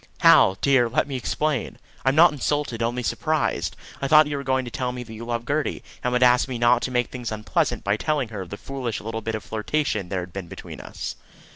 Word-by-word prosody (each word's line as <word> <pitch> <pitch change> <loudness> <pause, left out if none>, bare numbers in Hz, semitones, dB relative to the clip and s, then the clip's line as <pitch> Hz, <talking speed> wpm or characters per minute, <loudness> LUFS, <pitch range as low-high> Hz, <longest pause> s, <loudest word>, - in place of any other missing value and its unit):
"Hal, 95 0 +6
dear, 130 -4 +4
let 130 - +1
me 140 - -4
explain. 140 +2 -1 0.3
I'm 130 +1 +2
not 170 +2 +7
insulted, 145 -4 -1
only 120 +2 -1
surprised. 155 +4 -1 0.3
I 140 - 0
thought 155 +1 +7
you 145 0 -3
were 140 - -4
going 130 -1 0
to 120 - -7
tell 125 +2 -2
me 125 0 -6
that 110 -2 -11
you 110 +1 -8
loved 120 0 -3
Gertie, 145 +1 -1 0.2
and 125 - 0
would 125 0 +3
ask 125 +1 +5
me 130 -2 -4
not 120 +1 +4
to - - -2
make 125 -1 0
things 125 -3 -5
unpleasant 110 0 -1
by 100 +1 +1
telling 145 -2 -1
her 105 -4 -6
of 90 - -8
the 100 - -6
foolish 130 -4 -4
little 110 +1 -5
bit 110 +1 -3
of 110 - -5
flirtation 110 -3 -2
there 95 -2 -1
had 90 0 -9
been 95 -3 -6
between - - -9
us." - - -6
125 Hz, 240 wpm, -24 LUFS, 110-140 Hz, 0.3 s, not